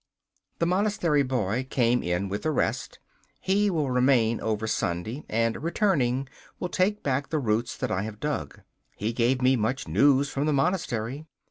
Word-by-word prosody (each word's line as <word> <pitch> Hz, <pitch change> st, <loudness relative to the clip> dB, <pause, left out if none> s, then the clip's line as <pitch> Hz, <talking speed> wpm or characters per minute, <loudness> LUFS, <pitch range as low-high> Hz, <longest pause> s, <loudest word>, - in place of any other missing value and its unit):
The 170 Hz, -, +1 dB
monastery 180 Hz, -5 st, +2 dB
boy 125 Hz, -2 st, -1 dB
came 120 Hz, -1 st, +2 dB
in 90 Hz, +3 st, -1 dB
with 100 Hz, +2 st, -3 dB
the 155 Hz, -, -1 dB
rest. 155 Hz, -, -1 dB, 0.4 s
He 200 Hz, +2 st, +2 dB
will 155 Hz, -7 st, 0 dB
remain 125 Hz, -3 st, +3 dB
over 110 Hz, -1 st, -1 dB
Sunday, 110 Hz, -, -2 dB
and, 115 Hz, +1 st, 0 dB
returning, 145 Hz, -, +1 dB, 0.3 s
will 180 Hz, -, -3 dB
take 200 Hz, +4 st, 0 dB
back 135 Hz, 0 st, -1 dB
the 160 Hz, -, 0 dB
roots 115 Hz, -3 st, -1 dB
that 130 Hz, -4 st, -2 dB
I 95 Hz, -, 0 dB
have 105 Hz, 0 st, -6 dB
dug. 140 Hz, -, -4 dB, 0.3 s
He 110 Hz, +3 st, -2 dB
gave 125 Hz, +2 st, +1 dB
me 130 Hz, +1 st, +5 dB
much 115 Hz, 0 st, -1 dB
news 135 Hz, -, +4 dB
from 140 Hz, +2 st, -1 dB
the 155 Hz, -, +2 dB
monastery. 140 Hz, -, -1 dB
130 Hz, 165 wpm, -26 LUFS, 110-150 Hz, 0.4 s, me